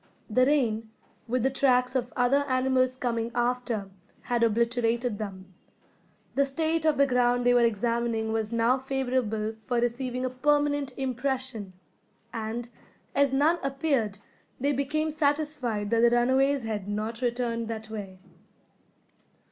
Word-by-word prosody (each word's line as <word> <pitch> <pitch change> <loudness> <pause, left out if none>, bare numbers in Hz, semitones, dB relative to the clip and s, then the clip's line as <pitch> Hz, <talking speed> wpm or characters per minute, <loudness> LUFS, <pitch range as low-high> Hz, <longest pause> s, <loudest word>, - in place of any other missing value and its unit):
The 255 +3 +4
rain, 225 -7 +1 0.4
with 245 0 0
the 265 - +2
tracks 250 -2 +2
of 245 -1 -1
other 260 +3 +3
animals 255 0 +2
coming 235 -3 -2
after, 240 -4 -1 0.3
had 240 -1 0
obliterated 235 0 +1
them. 190 -3 -7 0.8
The 280 - +3
state 320 +3 0
of 305 -2 +3
the 280 - +5
ground 245 -1 +2
they 245 - +5
were 245 - +5
examining 230 0 0
was 220 -1 -1
now 235 +3 +2
favourable 255 -5 -1
for 245 +3 -2
receiving 250 +1 -1
a 255 - -2
permanent 290 +1 +1
impression; 255 -5 -2 0.6
and, 225 +1 -4 0.5
as 280 -1 +3
none 300 +6 +3
appeared, 270 -7 0 0.4
they 280 +3 +1
became 305 +3 -1
satisfied 290 -8 0
that 230 - +3
the 235 +1 +6
runaways 260 +3 +2
had 210 -3 -4
not 215 +3 -3
returned 235 -2 -1
that 220 -1 -6
way. 195 -4 -6
245 Hz, 135 wpm, -27 LUFS, 225-270 Hz, 0.8 s, the